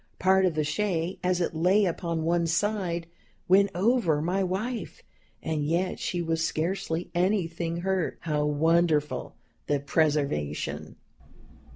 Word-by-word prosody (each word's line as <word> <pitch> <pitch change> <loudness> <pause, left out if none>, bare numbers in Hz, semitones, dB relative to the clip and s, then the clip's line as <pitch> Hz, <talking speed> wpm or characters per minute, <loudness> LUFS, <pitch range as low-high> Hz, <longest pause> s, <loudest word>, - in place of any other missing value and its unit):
Part 190 0 +4
of 170 - -2
the 155 - +1
shay, 170 +2 -1
as 180 0 +1
it 170 - -1
lay 185 +6 +3
upon 170 -2 -2
one 170 +1 +1
side, 175 -1 0 0.4
went 200 +2 +5
over 190 -6 +2
my 180 +5 0
wife, 215 +7 -4 0.4
and 155 -2 -1
yet 170 +5 0
she 175 -1 -2
was 165 0 0
scarcely 170 +1 -2
anything 170 -2 0
hurt. 190 -2 -1
How 150 -2 -1
wonderful 150 -2 +1 0.3
the 145 -1 +1
preservation! 140 - -1
170 Hz, 130 wpm, -27 LUFS, 160-190 Hz, 0.4 s, went